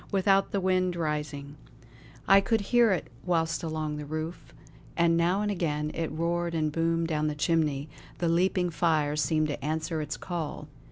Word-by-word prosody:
Without, 195 0 +3
the 200 - -1
wind 185 -1 +1
was - - -5
rising. 150 -2 -3 0.7
I 195 0 +7
could 225 +3 +1
hear 240 -3 +6
it 185 - 0 0.2
whistle 165 -1 0
along 155 -1 -3
the 150 - -6
roof, 155 +3 -5 0.5
and 170 0 +4
now 175 +4 +2
and 205 - 0
again 150 -5 -1
it 165 -1 -2
roared 170 +2 -1
and 155 -1 0
boomed 165 +1 0
down 155 -1 0
the 150 - -2
chimney; 150 -2 0 0.3
the 175 - 0
leaping 180 +1 +2
fire 155 -3 +1
seemed 155 +1 +1
to 145 - -4
answer 155 +2 -2
its 150 0 -4
call. 170 -5 -5
165 Hz, 175 wpm, -28 LUFS, 150-180 Hz, 0.7 s, I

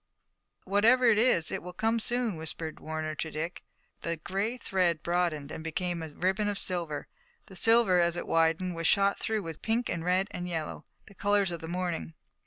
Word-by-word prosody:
"Whatever 225 +6 +4
it 215 -2 +4
is, 220 -9 +3
it - - -2
will 180 +1 -8
come 225 +4 +1
soon," 240 -2 -1
whispered 160 0 -5
Warner 155 0 -3
to 160 +1 -4
Dick. 160 +3 -4 0.4
The 170 0 -2
gray 195 +9 -2
thread 180 -8 0
broadened 170 -4 0
and 160 - -6
became 175 +1 -2
a 160 - -5
ribbon 190 +7 0
of 205 -1 -1
silver. 170 -6 -3 0.4
The 190 - -13
silver, 225 -3 +5
as 170 0 +2
it 175 - -4
widened, 165 +2 +2
was 165 -1 -1
shot 200 -1 +4
through 220 -2 -1
with 165 -2 -7
pink 230 +1 0
and 165 - -2
red 185 +2 +2
and 180 0 -4
yellow, 160 -3 -4 0.2
the - - -15
colors 200 -1 +2
of 170 - -4
the 160 - -6
morning. 175 -2 -3
180 Hz, 190 wpm, -29 LUFS, 165-205 Hz, 0.4 s, silver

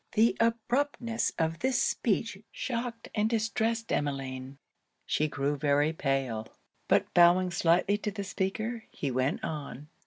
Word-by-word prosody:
The 225 +1 +4
abruptness 235 +1 0
of 165 0 0
this 260 -1 +1
speech 225 -3 0
shocked 235 -2 -4
and 215 0 +1
distressed 225 0 0
Emmeline. 135 -2 -2 0.5
She 155 - +1
grew 145 0 -1
very 145 +2 +2
pale; 135 -7 -1 0.4
but - - +2
bowing 175 +1 +5
slightly 175 +4 +2
to 210 - -2
the 200 0 -4
speaker, 215 +4 -3
he 140 - -3
went 135 - 0
on. 150 - -5
190 Hz, 130 wpm, -29 LUFS, 145-230 Hz, 0.5 s, bowing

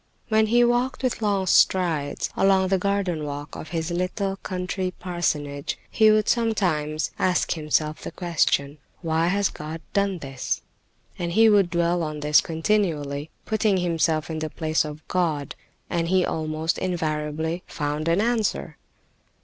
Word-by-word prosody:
When 220 0 +3
he 240 +2 +4
walked 245 +3 +1
with 255 -3 -1
long 200 -3 +1
strides 165 -5 +2
along 190 -1 +3
the 190 -1 +2
garden 195 -5 0
walk 145 0 -6
of 155 - -8
his 165 0 -2
little 190 +3 -1
country 185 0 -3
parsonage, 150 -6 -2
he 220 -1 +5
would 215 -1 +3
sometimes 175 -10 0
ask 185 -1 +1
himself 155 -1 0
the - - -5
question: 155 -4 0 0.2
"Why 165 0 +1
has 200 +2 +2
God 155 +2 -7
done 200 -2 +1
this?" 135 -5 -4 0.6
And 170 -1 -2
he 225 +3 +6
would 200 -4 +4
dwell 170 0 +1
on 155 -2 -4
this 150 0 +5
continually, 160 -5 -1 0.2
putting 215 -2 +1
himself 165 -3 0
in 160 - -3
the 155 0 -3
place 155 0 0
of 150 +1 -9
God, 160 -6 -1 0.3
and 170 -1 -1
he 185 +1 +3
almost 155 +1 -2
invariably 160 -1 -2
found 150 +1 -3
an 170 +4 +3
answer. 230 -1 -1
170 Hz, 150 wpm, -24 LUFS, 155-195 Hz, 0.6 s, he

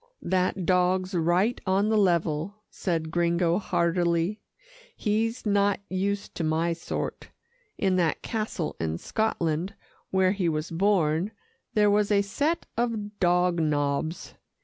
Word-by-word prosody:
"That 185 0 0
dog's 185 +1 +2
right 175 +7 +1
on 195 +3 +2
the 220 - +2
level," 170 -1 +1 0.2
said 165 -4 -2
Gringo 170 +1 +2
heartily. 170 +1 0 0.5
"He's 225 +3 -1
not 205 -1 +2
used 200 +2 -2
to 170 - -3
my 160 +2 +1
sort. 165 - -5 0.5
In 190 -2 +1
that 170 -3 0
castle 215 -7 -3
in 80 0 -2
Scotland, 180 - -1 0.3
where 190 -1 +3
he 190 -4 0
was 155 +2 -3
born, 175 -1 +2 0.5
there 210 -1 +4
was 205 0 +2
a 200 -1 +3
set 290 +11 -1
of 220 -3 -2
dog 180 -1 +3
nobs. 150 +1 -1
185 Hz, 125 wpm, -27 LUFS, 170-205 Hz, 0.5 s, there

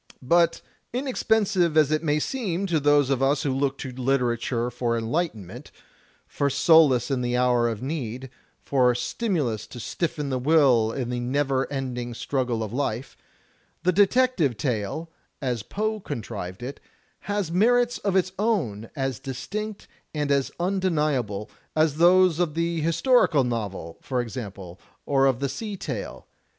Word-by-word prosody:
But 170 +4 +3 0.3
inexpensive 215 - +1
as 155 -2 +5
it 155 - +1
may 150 -2 +1
seem 195 - -2
to 170 -5 +1
those 145 -1 +3
of 135 -1 +1
us 140 +2 +2
who 140 - 0
look 135 0 0
to 130 - -6
literature 125 -2 0
for 120 -1 -1
enlightenment, 115 - -3 0.6
for 140 - -1
solace 140 -3 +4
in 130 -2 0
the 120 0 0
hour 125 -1 +3
of 115 0 -5
need, 130 -3 -4 0.3
for 125 -3 +3
stimulus 140 - -2
to 125 - -10
stiffen 150 +1 -3
the 130 - 0
will 130 -6 +4
in 125 -1 -3
the 125 - -2
never 135 +1 0
ending 125 -3 -4
struggle 125 -3 -1
of 110 0 -6
life, 125 -2 -2 0.7
the 180 - +4
detective 200 - +3
tale, 130 +5 -2 0.3
as 125 -5 -2
Poe 215 - -2
contrived 110 - -6
it, 135 +3 -6 0.4
has 205 -5 -2
merits 240 +6 +3
of 200 -2 -1
its 185 -1 +2
own 140 - -1
as 135 -4 -2
distinct 200 - -5 0.3
and 145 -1 -1
as 140 -1 +2
imdeniable, 150 - 0 0.3
as 155 -2 +2
those 175 0 +5
of 165 -4 0
the 165 0 0
historical 165 - +3
novel, 105 -9 -4
for 130 -2 -2
example, 100 -7 -6 0.2
or 135 -1 +3
of 130 -3 +1
the 140 - +1
sea 205 - -5
tale. 125 - -6
140 Hz, 150 wpm, -25 LUFS, 120-170 Hz, 0.7 s, as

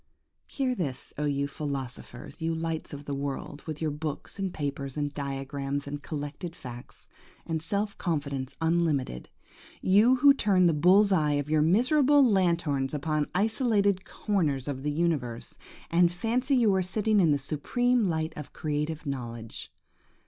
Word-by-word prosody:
Hear 265 -2 -1
this, 150 - -4
oh 150 - 0
you 140 -1 0
philosophers,–you 140 +2 -4
lights 165 -1 -3
of 145 0 -8
the 145 - -3
world, 140 +1 -4
with 155 -1 -4
your 155 - 0
books 150 +5 -5
and 195 -1 -1
papers 140 -2 -4
and 145 -1 -1
diagrams, 140 0 -3
and 145 +1 -5
collected 150 +4 -5
facts, 120 -6 -10 0.4
and 160 -1 -2
self 200 +5 -2
confidence 140 -6 -2
unlimited! 160 - 0 0.5
You 210 +7 +5
who 280 +2 +7
turn 200 -8 +3
the 170 - +4
bull's 190 +7 +5
eye 155 -5 +3
of 145 +1 -1
your 155 -1 +4
miserable 265 - +4
lanthorns 170 - +1
upon 150 0 -1
isolated 205 -2 +2
corners 155 - -1
of 135 -2 -3
the 150 - -1
universe, 145 -7 -1 0.3
and 170 0 +4
fancy 245 +9 0
you 230 -5 +4
are 190 - +2
sitting 210 +3 +1
in 170 -4 +4
the 145 - +4
supreme 230 - +1
light 160 -3 -1
of 150 - -8
creative 150 +1 -3
knowledge! 120 -5 -6
155 Hz, 150 wpm, -28 LUFS, 140-195 Hz, 0.5 s, who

